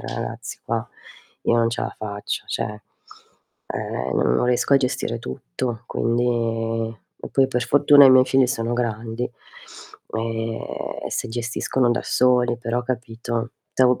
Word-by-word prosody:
ra-ragazzi, -, -, -5 dB
qua -, -, -2 dB, 0.6 s
io 120 Hz, -, +3 dB
non 115 Hz, -1 st, +3 dB
ce 120 Hz, -, -3 dB
a -, -, -3 dB
faccio", 105 Hz, -1 st, -4 dB
cioè 105 Hz, 0 st, -3 dB, 0.9 s
eh, 65 Hz, +1 st, -3 dB
n -, -, 0 dB
non 65 Hz, -, +2 dB
riesco 125 Hz, +3 st, +3 dB
a -, -, +9 dB
gestire 125 Hz, -3 st, -1 dB
tutto, 110 Hz, -, -5 dB
quindi 115 Hz, -1 st, 0 dB, 0.3 s
e -, -, -6 dB
poi 135 Hz, -1 st, +4 dB
per 125 Hz, -2 st, 0 dB
fortuna 145 Hz, 0 st, +7 dB
i 130 Hz, -, +8 dB
miei 130 Hz, 0 st, +7 dB
figli 135 Hz, -1 st, +4 dB
sono 115 Hz, -2 st, -1 dB
grandi 115 Hz, 0 st, -2 dB, 0.9 s
e 115 Hz, 0 st, -2 dB, 0.4 s
e -, -, -5 dB
si -, -, -2 dB
gestiscono 120 Hz, +2 st, 0 dB
da 120 Hz, +1 st, +1 dB
soli, 125 Hz, -1 st, +3 dB
però 120 Hz, +1 st, -1 dB
capito? 120 Hz, -1 st, -3 dB, 0.2 s
To 125 Hz, -1 st, +4 dB
120 Hz, 145 wpm, -23 LUFS, 115-125 Hz, 0.9 s, a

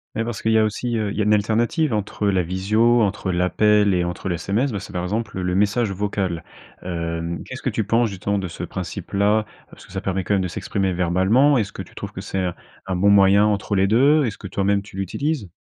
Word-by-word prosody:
Ouais, 115 Hz, -, 0 dB
parce 115 Hz, -1 st, -5 dB
qu'il 110 Hz, -, +1 dB
y -, -, +5 dB
a 110 Hz, -, +4 dB
aussi, 115 Hz, +2 st, -1 dB
heu, 105 Hz, -2 st, -1 dB
il -, -, -6 dB
y -, -, +1 dB
a -, -, +3 dB
une 105 Hz, +1 st, +4 dB
alternative 115 Hz, +7 st, +1 dB
entre 105 Hz, 0 st, -2 dB
la 95 Hz, -2 st, +2 dB
visio, 110 Hz, +7 st, +2 dB
entre 100 Hz, -1 st, -1 dB
l'appel 100 Hz, +3 st, +3 dB
et 90 Hz, -1 st, +1 dB
entre 90 Hz, +2 st, -4 dB
le 90 Hz, -, 0 dB
SMS. 115 Hz, +10 st, -1 dB
Bah, 105 Hz, -, -3 dB
c'est -, -, -10 dB
par 90 Hz, 0 st, -3 dB
exemple 105 Hz, +1 st, -3 dB
le 90 Hz, 0 st, -1 dB
message 105 Hz, +3 st, +1 dB
vocal, 95 Hz, -4 st, -2 dB, 0.4 s
heu. 85 Hz, -1 st, -3 dB
Qu'est-ce -, -, -8 dB
que -, -, -1 dB
tu 110 Hz, -, -1 dB
penses 115 Hz, +3 st, +2 dB
justement 100 Hz, +1 st, -2 dB
de 95 Hz, -, -3 dB
ce 85 Hz, -, -7 dB
principe -, -, -6 dB
là? 105 Hz, +2 st, +2 dB, 0.2 s
Parce -, -, -15 dB
que -, -, -18 dB
ça 95 Hz, 0 st, -4 dB
permet 95 Hz, -1 st, -2 dB
quand 100 Hz, -, -1 dB
même 100 Hz, -, +2 dB
de 90 Hz, -, -1 dB
s'exprimer 95 Hz, +1 st, -2 dB
verbalement. 95 Hz, +11 st, +3 dB
Est-ce 105 Hz, -3 st, -2 dB
que -, -, -7 dB
tu -, -, -18 dB
trouves -, -, -7 dB
que -, -, -7 dB
c'est 95 Hz, -, -4 dB
un 90 Hz, -2 st, -2 dB, 0.3 s
un 95 Hz, -, -1 dB
bon 100 Hz, +3 st, +4 dB
moyen 100 Hz, +1 st, +6 dB
entre 105 Hz, -1 st, 0 dB
les 95 Hz, 0 st, +3 dB
2? 140 Hz, +8 st, +4 dB
Est-ce 110 Hz, -4 st, -4 dB
que -, -, -7 dB
toi-même 100 Hz, +2 st, 0 dB
tu 100 Hz, -1 st, -13 dB
l'utilises? 115 Hz, -, -2 dB
100 Hz, 250 wpm, -22 LUFS, 95-110 Hz, 0.4 s, moyen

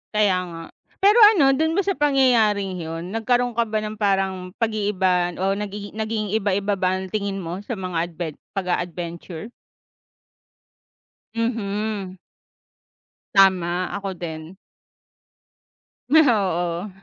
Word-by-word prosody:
Kaya 205 Hz, -3 st, +3 dB
nga 165 Hz, -1 st, -8 dB, 0.3 s
pero 420 Hz, +4 st, +5 dB
ano 350 Hz, -11 st, +7 dB
dun 320 Hz, +5 st, 0 dB
ba 395 Hz, -, +1 dB
sa 390 Hz, -, +1 dB
pangyayaring 240 Hz, -, +2 dB
yun 165 Hz, +4 st, -6 dB
nagkaroon 245 Hz, +2 st, +1 dB
ka 230 Hz, -1 st, 0 dB
ba 215 Hz, -, 0 dB
ng 215 Hz, 0 st, -7 dB
parang 190 Hz, -2 st, 0 dB
pag-iiba 200 Hz, -6 st, +1 dB
o 195 Hz, +1 st, +1 dB
nagi 205 Hz, 0 st, -6 dB
naging 215 Hz, -1 st, -3 dB
iba-iba 200 Hz, -1 st, 0 dB
ba 185 Hz, -1 st, 0 dB
ang 190 Hz, -, -5 dB
tingin 200 Hz, -2 st, -2 dB
mo 180 Hz, +1 st, -5 dB
sa 215 Hz, +1 st, -5 dB
mga 175 Hz, -2 st, -2 dB
adven 165 Hz, -2 st, -5 dB, 0.2 s
pag-a-adventure? 175 Hz, +1 st, -4 dB, 1.8 s
Mhm. 210 Hz, -4 st, -2 dB, 1.2 s
Tama, 185 Hz, -2 st, +3 dB
ako 200 Hz, -1 st, -4 dB
din. 165 Hz, 0 st, -7 dB, 1.5 s
Oo. 195 Hz, -, +2 dB
200 Hz, 115 wpm, -22 LUFS, 180-220 Hz, 1.8 s, ano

